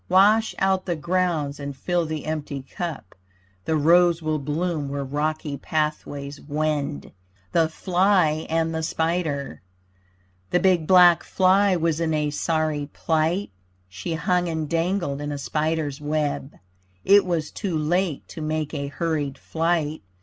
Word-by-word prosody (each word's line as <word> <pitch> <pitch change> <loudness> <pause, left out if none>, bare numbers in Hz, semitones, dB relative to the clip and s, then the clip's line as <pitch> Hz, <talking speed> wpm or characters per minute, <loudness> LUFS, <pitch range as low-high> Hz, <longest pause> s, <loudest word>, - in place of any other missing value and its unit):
Wash 210 +4 +4
out 190 -1 +1
the 175 - 0
grounds 165 -4 -1
and 140 -1 -6
fill 175 +4 0
the 155 -1 -4
empty 150 -3 -4
cup. 160 - -6 0.5
The 160 - +1
rose 170 +2 +5
will 155 -1 -1
bloom 150 +1 -2
where 140 0 -3
rocky 150 +1 -2
pathways 145 -1 -3
wend. 150 -1 -2 0.4
THE 165 -2 +3
FLY 180 -3 +2
AND 165 0 0
THE 160 - -2
SPIDER 160 - -2 0.9
The 180 - +2
big 180 -5 +2
black 180 -2 +7
fly 190 +1 +3
was 165 -2 0
in 160 -2 0
a 150 -1 0
sorry 155 -1 -1
plight; 165 +5 0 0.4
She 160 - -4
hung 175 +2 +1
and 160 -2 -2
dangled 165 -3 -1
in 145 0 -3
a 145 - -3
spider's 150 +2 -2
web. 150 -1 -2 0.5
It 200 +1 +7
was 170 -4 -2
too 185 -7 -3
late 165 0 0
to 160 - -8
make 155 0 -2
a 140 -2 -3
hurried 145 -2 -2
flight. 160 -1 -1
160 Hz, 140 wpm, -24 LUFS, 150-175 Hz, 0.9 s, black